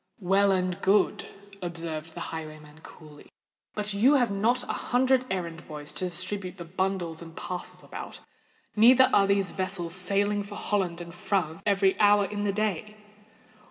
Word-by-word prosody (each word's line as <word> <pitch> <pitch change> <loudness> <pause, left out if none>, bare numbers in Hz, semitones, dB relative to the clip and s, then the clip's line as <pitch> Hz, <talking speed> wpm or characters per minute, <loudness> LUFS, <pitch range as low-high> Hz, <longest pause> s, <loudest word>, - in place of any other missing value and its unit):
"Well 195 +1 +3
and 185 -1 0
good," 200 +2 +2 0.3
observed 165 -2 -5
the - - -6
highwayman 155 -1 -8
coolly. 150 -2 -14 0.5
"But 210 -1 -2
you 245 +9 +4
have 245 -6 +2
not 225 +5 +1
a - - -4 0.2
hundred 255 +1 +3
errand 170 -3 -4
boys 150 -2 -7
to 185 - -2
distribute 185 +1 -3
the 170 - -7
bundles 180 -2 -2
and 165 -1 -11
parcels 180 -1 -6
about: - - -8 0.6
neither 255 +4 +6
are 195 -1 +5
there 200 0 +3
vessels 185 -2 -2
sailing 200 +3 +1
for 205 +1 -8
Holland 185 -6 -1
and 170 -1 -9
France 175 -4 -2
every 195 -1 +2
hour 205 -1 +5
in 205 +1 -3
the 200 - +2
day." 210 0 -2
190 Hz, 160 wpm, -27 LUFS, 170-205 Hz, 0.6 s, neither